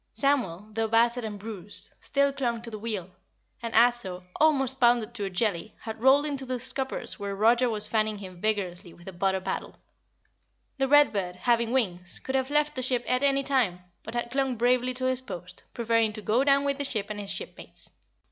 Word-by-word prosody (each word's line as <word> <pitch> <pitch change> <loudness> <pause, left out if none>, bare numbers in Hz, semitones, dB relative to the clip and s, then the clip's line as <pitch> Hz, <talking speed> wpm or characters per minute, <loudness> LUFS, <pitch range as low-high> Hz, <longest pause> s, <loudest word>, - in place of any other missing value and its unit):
Samuel, 215 - 0
though 225 +1 0
battered 235 +2 +3
and 215 -2 -4
bruised, 205 -2 -8
still 280 0 +1
clung 240 -4 -2
to 235 - -8
the 215 - -6
wheel, 205 -5 -4 0.5
and 230 -1 -4
Ato, 225 -6 +3
almost 270 -4 +3
pounded 240 -2 +3
to 210 -4 -3
a - - -2
jelly, 195 0 -1
had 220 0 -7
rolled 270 +3 +5
into 280 -3 -3
the 255 -1 -3
scuppers 260 0 -3
where 200 -1 -3
Roger 235 +4 +4
was 210 -2 -3
fanning 215 -1 0
him 185 -3 -10
vigorously 185 -5 -2
with 175 - -17
a 190 - -6
butter 190 +2 +1
paddle. 185 - -4 1.0
The 270 - +2
Read 290 -1 +6
Bird, 180 -3 -2
having 235 +4 +1
wings, 180 -9 -1
could 265 - -5
have 265 0 +1
left 300 0 +2
the 255 - -3
ship 250 -1 0
at 255 +1 +1
any 275 -1 +2
time, 245 -11 +1 0.2
but 220 - -8
had 240 0 -2
clung 270 -1 0
bravely 250 +2 +2
to 255 0 -3
his 255 0 +1
post, 180 -6 -9
preferring 230 -2 +1
to 215 - -7
go 230 +6 +2
down 280 0 +4
with 280 0 0
the - - 0
ship 220 -6 -2
and 210 - -5
his 200 -1 -5
shipmates. 475 - -7
235 Hz, 205 wpm, -27 LUFS, 205-265 Hz, 1.0 s, Read